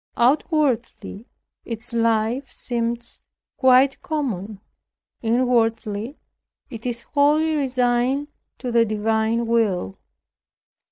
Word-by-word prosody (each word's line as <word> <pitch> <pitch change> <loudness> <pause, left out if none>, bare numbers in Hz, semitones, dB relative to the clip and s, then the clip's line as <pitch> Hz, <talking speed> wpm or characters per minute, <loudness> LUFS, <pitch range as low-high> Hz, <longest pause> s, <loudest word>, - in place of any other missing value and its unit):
Outwardly, 255 - 0 0.4
its 235 +1 -6
life 230 +3 0
seems 235 -1 -4 0.4
quite 260 +1 +4
common; 220 - -3 0.6
inwardly, 230 0 0 0.5
it 230 0 -6
is 235 -1 -3
wholly 300 +2 +2
resigned 260 0 0 0.3
to 250 - -4
the 235 0 +4
divine 220 +1 0
will. 210 - 0
235 Hz, 80 wpm, -22 LUFS, 225-260 Hz, 0.6 s, quite